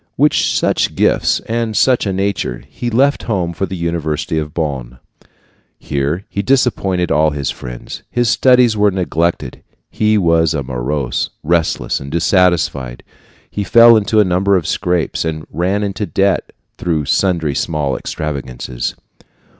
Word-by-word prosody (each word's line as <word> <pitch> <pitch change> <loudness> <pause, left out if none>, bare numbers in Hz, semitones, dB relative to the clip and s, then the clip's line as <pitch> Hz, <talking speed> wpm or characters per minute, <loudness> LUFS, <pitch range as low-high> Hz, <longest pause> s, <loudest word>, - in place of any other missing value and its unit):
With - - +4
such - - +1
gifts, - - +2
and 115 -1 -2
such 125 -5 +3
a - - 0
nature, 95 -10 -2
he 120 - -4
left 135 +5 +2
home 90 -5 -1
for 95 +3 -2
the 95 - -5
university 80 -2 -2
of 75 -1 -5
Bonn. 70 -7 -4 0.8
Here 75 +7 -2
he 100 - -3
disappointed 100 -7 +1
all 75 +1 +3
his 70 -2 -3
friends. - - -8
His 120 0 0
studies 125 -1 +4
were 105 0 +3
neglected; 85 -3 -2 0.3
he 110 0 +2
was 85 -4 +2
morose, 65 -1 -2
restless, 85 0 0
and 70 +1 -8
dissatisfied. 85 -7 +1 0.5
He 105 - -2
fell 115 +4 +7
into 110 0 +2
a - - +6
number 95 +2 +2
of 85 - -3
scrapes, 90 0 -1
and 80 -2 -4
ran 95 +6 0
into 100 +1 -3
debt 100 -1 0 0.3
through 80 -4 -1
sundry 85 -3 +1
small 75 -3 -1
extravagances. 65 -5 -4
85 Hz, 140 wpm, -16 LUFS, 75-100 Hz, 0.8 s, fell